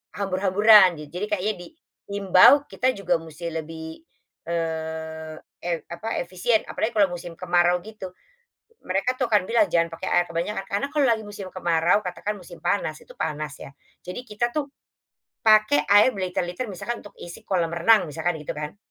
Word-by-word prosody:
hambur-hamburan 195 0 +5
ja - - -9
jadi 205 - -1
kayaknya 205 +3 -1 0.5
diimbau 200 +7 +6
kita 255 - 0
juga 180 -3 0
musti 165 +1 -7
lebih, 160 0 -7 0.5
eee 160 -1 -4 0.3
eee, 170 -2 -2
apa 215 +7 -4
efisien 185 +6 0
apalagi 225 +2 -3
kalau 200 -3 +4
musim 175 -1 -7
kemarau 175 0 +2
gitu, 195 -4 -9 0.7
mereka 195 +7 0
tuh 255 -3 -2
akan 205 -3 +3
bilang 235 +6 +4
jangan 170 0 +3
pakai 165 +3 -6
air 175 - +3
kebanyakan 175 +4 -3
karena 200 +8 -1
kalau 295 -2 +2
lagi 225 -2 +1
musim 205 -2 -8
kemarau 175 +2 +2
katakan 180 +3 -4
musim 175 -3 -12
panas 160 -4 -1
itu - - -16
panas 150 -2 -4
ya, - - -10 0.3
jadi 180 +5 -6
kita 235 +3 -1
tuh, 290 +2 -2 0.8
pakai 215 -9 +5
air 205 +5 +6
berliter-liter 185 +3 -3
misalkan 235 +6 -5
untuk 205 - -15
isi 170 - -10
kolam 170 -4 -1
renang 210 +4 +4
misalkan 160 +2 -2
gitu 150 - -6
kan. 150 +5 -6
180 Hz, 160 wpm, -24 LUFS, 165-210 Hz, 0.8 s, diimbau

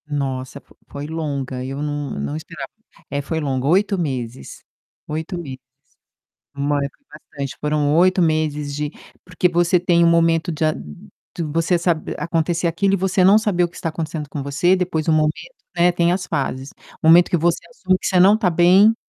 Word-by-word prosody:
Nossa, 135 -2 -4
fo - - -24
foi 145 +1 -7
longa 140 -5 -4
eu 135 +2 -5
não 145 -2 -3
não 70 +1 -3
esperava, 80 - -8 0.4
é 140 +1 -2
foi 160 +3 -3
longa, 135 -3 -2
8 195 +5 +2
meses, 125 - -5 0.4
8 160 +4 -4
meses. 135 -6 -7 1.0
Foi 145 +1 0 0.3
bastante, 140 -2 -7
foram 150 -1 +1
8 185 +2 +4
meses 155 -3 0
de 150 0 -3 0.3
porque 180 0 0
você 175 +1 +2
tem 170 -1 +2
um - - +5
momento 165 0 +2
de 160 -1 -2
a 155 - +3
de 75 - -10
você 165 +3 0
sabe 170 -2 -1
a - - -3
acontecer 170 +1 0
aquilo 190 +4 +1
e - - +3
você 190 +1 +1
não 195 +3 +7
saber 205 -6 +1
o - - -1
que 170 - -18
está 165 - -3
acontecendo 155 -1 -5
com 145 0 -5
você, 150 +6 +2
depois 175 -4 -1
o 165 - +3
momento, 155 0 +2 0.4
né, 175 +1 +4
tem 175 -1 +2
as 180 0 -2
fases, 135 -3 -3 0.3
o - - 0
momento 175 +2 +7
que - - +1
você 170 +1 +1
assume 185 -6 0
que - - -5
você 185 - +2
não 190 +3 +7
está 215 -4 +1
bem, 180 +6 +5
160 Hz, 190 wpm, -20 LUFS, 145-175 Hz, 1.0 s, não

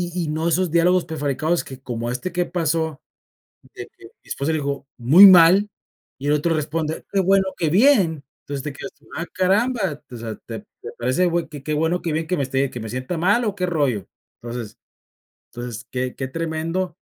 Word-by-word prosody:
y 180 - -1
y 150 - -4
no 160 +2 -1
esos 175 0 +1
diálogos 175 +1 +3
prefabricados, 155 +2 -1
que 130 - -9
como 120 -2 -4
este, 170 +9 -4
que 175 0 0
pasó, 160 -3 -1 0.7
de - - -8
que - - -17 0.2
mi - - -21
esposa 140 +3 -2
le 155 - 0
dijo: 140 -1 -3
"Muy 155 +12 +9
mal" 185 +2 +7 0.5
y 145 - -3
el 150 - +4
otro 165 +2 +1
responde: 155 +1 -2
"Qué 200 - +1
bueno, 190 +1 +3
que 165 - +1
bien", 190 - +4 0.2
entonces, 140 -2 -5
te 150 - -4
quedas - - -8
tú: 145 - -28
"Ah 165 - -2
caramba, 190 - +1
o 120 - -8
sea, 115 -1 -6
te - - -6 0.2
te - - -6
parece 130 +9 +1
güey 170 -2 0
que 145 -3 -9
que 155 +1 -1
bueno, 160 +4 +1
que 165 - -2
bien 160 +1 -1
que 180 - 0
me 140 - 0
esté 135 +1 0
que - - -7
me 110 - -6
sienta 130 +8 -4
mal 205 +8 +2
o 205 -3 -1
qué 180 - -1
rollo", 140 - 0 0.4
entonces, 120 -2 -7 0.7
entonces, 120 -1 -7
que 125 0 -3
que 130 - -4
tremendo, 165 +4 -3
160 Hz, 205 wpm, -22 LUFS, 135-180 Hz, 0.7 s, Muy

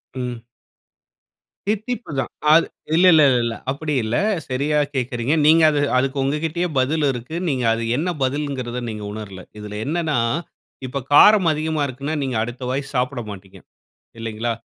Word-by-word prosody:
ம். 125 -2 -5 1.2
தித்திப்பு 220 +2 -2
தான் 130 - -3 0.2
அது 165 - +6 0.3
இல்ல, 175 +3 +5
இல்ல, 155 -1 +6
இல்ல, 125 - +3
இல்ல. 115 -1 -1 0.2
அப்படி 150 +2 -3
இல்ல, 110 +2 -2 0.3
சரியா 140 +4 0 0.2
கேட்கிறீங்க. 125 +1 -1
நீங்க 160 +2 +6
அது 150 -1 0 0.2
அதுக்கு 135 +2 0
உங்க 140 +3 0
கிட்டயே 170 +3 -1
பதில் 150 +4 +1
இருக்கு. 125 +5 -7
நீங்க 130 -3 -1
அது 115 0 -2
என்ன 170 +5 -1
பதில்ங்கறத 130 -3 -2
நீங்க 105 -1 -6
உணரல. 100 -4 -8 0.2
இதில் 105 0 -7
என்னனா 160 -1 -1 0.7
இப்ப 140 +2 -3
காரம் 205 +3 +7
அதிகமா 155 0 -2
இருக்குன்னா 140 +5 -4
நீங்க 130 -2 -2
அடுத்த 120 +2 -7
வாய் 135 +2 -3
சாப்பிட 125 +1 0
மாட்டீங்க 95 -2 -10 0.6
இல்லைங்களா? 115 +1 -3
135 Hz, 150 wpm, -21 LUFS, 120-155 Hz, 1.2 s, காரம்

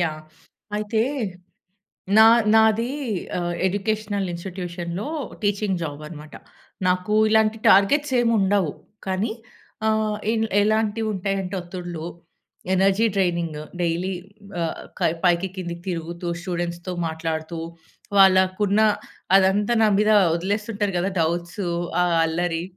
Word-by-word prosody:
Yeah! 155 -2 -2 0.5
అయితే, 215 +1 0 1.2
నా 220 - +9 0.3
నాదీ 220 +2 +4 0.5
ఆహ్, 175 0 -2
ఎడ్యుకేషనల్ 205 0 -1
ఇన్స్‌టిట్యూషన్‌లో 175 +1 -5 0.4
టీచింగ్ 205 -3 0
జాబనమాట. 150 0 -7 0.5
నాకు 180 +3 0
ఇలాంటి 220 0 +3
టార్గెట్సేం 240 +4 +4
ఉండవు, 195 -5 +2 0.3
కానీ 190 +4 -1 0.6
ఆహ్, 215 -1 +1 0.2
ఇన్ 225 -1 +1 0.2
ఎలాంటివుంటాయంటే 205 -3 -1
ఒత్తిడులు, 175 -2 -7 0.7
ఎనర్జీ 195 +4 +3
ట్రైనింగు 170 -5 0 0.2
డైలీ 175 +3 -1 0.5
ఆహ్, 165 - -3 0.2
కయ్ 160 - +2
పైకి 175 +1 +3
కిందకి 170 -2 -5
తిరుగుతూ, 170 0 -4
స్టూడెంట్స్‌తో 175 0 -4
మాట్లాడుతూ, 160 +1 -4 0.6
వాళ్ళకున్న 190 +2 +4 0.6
అదంతా 195 +3 +3
నా 215 - +5
మీద 210 +1 +3 0.3
ఒదిలేస్తుంటారు 205 +2 -2
గదా 185 +3 0
డౌట్స్, 170 +3 -1 0.4
ఆ - - +3 0.2
అల్లరి. 165 0 -1
190 Hz, 100 wpm, -23 LUFS, 170-210 Hz, 1.2 s, నా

